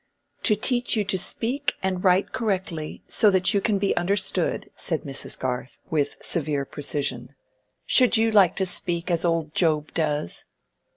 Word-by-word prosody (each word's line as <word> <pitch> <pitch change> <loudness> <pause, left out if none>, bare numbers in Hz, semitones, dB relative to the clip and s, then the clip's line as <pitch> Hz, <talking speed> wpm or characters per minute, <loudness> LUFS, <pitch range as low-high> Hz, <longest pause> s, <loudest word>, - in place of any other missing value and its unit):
"To 215 - +4
teach 245 +3 +2
you 215 - 0
to 195 -1 0
speak 260 +9 +1
and 185 -1 -2
write 185 0 +2
correctly, 190 -8 -4
so 215 - +3
that 190 +1 +3
you 200 - +1
can 210 0 0
be 195 0 -1
understood," 185 0 0
said 160 -3 -3
Mrs. 135 -1 -5
Garth, 125 0 -5
with 145 -3 -1
severe 150 -4 -1
precision. 140 -3 -4 0.5
"Should 250 -2 +5
you 225 0 +1
like 200 -5 +4
to 190 - 0
speak 175 -1 +2
as 170 -1 0
old 165 -3 -1
Job 155 -3 0
does?" 150 - -2
180 Hz, 160 wpm, -23 LUFS, 150-200 Hz, 0.5 s, Should